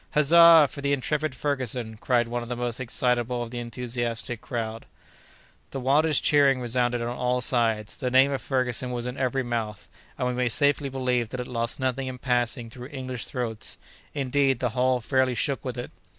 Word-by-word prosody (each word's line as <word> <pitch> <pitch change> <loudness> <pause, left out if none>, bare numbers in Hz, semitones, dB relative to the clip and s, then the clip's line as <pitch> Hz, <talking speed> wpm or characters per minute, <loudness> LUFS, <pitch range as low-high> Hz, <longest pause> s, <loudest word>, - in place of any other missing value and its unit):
"Huzza 165 +1 +7
for 140 - -9
the 140 0 +1
intrepid 150 +1 -1
Ferguson!" 130 -5 -2
cried 120 +1 +1
one 120 +1 -3
of 120 - -8
the 125 - -2
most 120 0 -3
excitable 125 -1 0
of 115 - -8
the 120 - -4
enthusiastic 120 0 -4
crowd. 115 -1 -5 0.8
The 135 - -5
wildest 145 +3 +2
cheering 140 -3 +4
resounded 120 0 0
on 120 +1 -3
all 125 0 0
sides; 115 -4 +1
the 125 - -1
name 130 +2 +5
of 135 - -2
Ferguson 130 -2 0
was 120 -1 -3
in 125 0 -4
every 135 0 -1
mouth, 115 -3 -4 0.3
and 125 - -1
we 125 - -1
may 125 0 0
safely 145 +3 +1
believe 125 -3 -1
that 125 - -6
it 125 - -3
lost 115 0 -3
nothing 130 0 -1
in 130 -1 -5
passing 120 -1 -1
through 125 +1 -9
English 130 -4 -5
throats. 115 -5 -4 0.4
Indeed, 135 -1 +1
the 125 - 0
hall 125 +2 +1
fairly 130 +1 +1
shook 140 +2 -1
with 125 -2 -5
it. 120 - -6
125 Hz, 190 wpm, -26 LUFS, 120-135 Hz, 0.8 s, Huzza